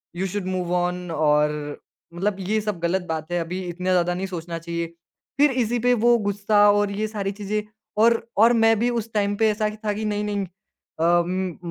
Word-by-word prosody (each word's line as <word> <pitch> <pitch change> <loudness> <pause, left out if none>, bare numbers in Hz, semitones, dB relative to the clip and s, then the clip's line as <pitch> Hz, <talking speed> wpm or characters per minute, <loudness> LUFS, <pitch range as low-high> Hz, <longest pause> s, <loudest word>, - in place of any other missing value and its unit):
You 190 +2 -1
should 200 0 -4
move on." 180 -1 -1
और 150 -1 +3 0.6
मतलब, 195 +3 -1
"ये 205 +3 0
सब 210 -4 -3
गलत 170 +3 0
बात 160 +1 -4
है, 175 - +1
अभी 180 +3 -4
इतना 180 +2 -3
ज़्यादा 180 -1 +2
नहीं 185 +2 -3
सोचना 170 -2 -5
चाहिए।" 170 0 -3 0.5
फिर 290 0 +5
इसी 240 +2 -1
पे 245 - +5
वो 240 0 +6
गुस्सा, 205 +1 +4
और 205 0 +1
ये 210 +2 -2
सारी 200 -2 -3
चीज़ें 210 +1 -1 0.3
और, 230 +1 +3
और 230 +3 +6
मैं 225 0 +5
भी 240 +2 +2
उस 230 -2 -3
टाइम 205 -1 +1
पे 220 0 +3
ऐसा 215 +1 -1
हीं 210 0 -2
था 210 - +1
कि, 215 +1 -4
"नहीं-नहीं। 205 -1 -1
अ, 175 -2 -1
म 185 -1 -2
195 Hz, 200 wpm, -23 LUFS, 175-210 Hz, 0.6 s, वो